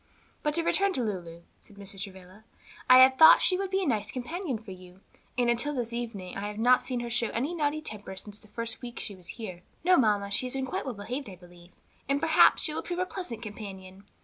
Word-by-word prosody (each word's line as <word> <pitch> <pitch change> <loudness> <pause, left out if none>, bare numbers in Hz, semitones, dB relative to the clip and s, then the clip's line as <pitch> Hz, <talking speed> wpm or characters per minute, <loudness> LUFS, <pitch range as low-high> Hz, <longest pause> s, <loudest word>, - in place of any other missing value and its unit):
"But 300 0 0
to 335 - +2
return 390 +3 +2
to 255 - -1
Lulu," 170 -5 -5 0.2
said 205 - -19
Mrs. 195 -1 -9
Travilla, 190 +1 -10 0.5
"I 255 - +10
had 260 +1 +7
thought 320 - +10
she 370 - +3
would 390 +1 -2
be 385 0 0
a - - -1
nice 215 -5 0
companion 270 - -4
for 215 -2 -11
you, 185 0 -13 0.4
and 245 -1 +2
until 240 +5 0
this 235 -2 -3
evening 225 -6 -5
I 200 +1 -3
have 210 0 -7
not 245 +3 +4
seen 250 -1 -3
her 240 - -5
show 235 0 +2
any 270 +9 -2
naughty 310 -2 -1
temper 205 -5 -5
since 210 +2 -9
the 215 - -18
first 230 +2 -4
week 240 -1 -8
she 205 - -5
was 180 -3 -13
here." 185 -7 -7 0.2
"No, 365 +1 +5
mamma, 205 -4 +2
she 255 - 0
has 250 - -8
been 265 -1 -2
quite 255 - -4
well 255 -4 -4
behaved, 245 +6 -5
I 190 - -9
believe, 175 0 -17 0.4
and 280 +1 +2
perhaps 320 0 +5
she 305 - -1
will - - -2
prove 350 - -5
a 365 - 0
pleasant 245 - -7
companion. 195 -3 -9
230 Hz, 240 wpm, -28 LUFS, 200-275 Hz, 0.5 s, I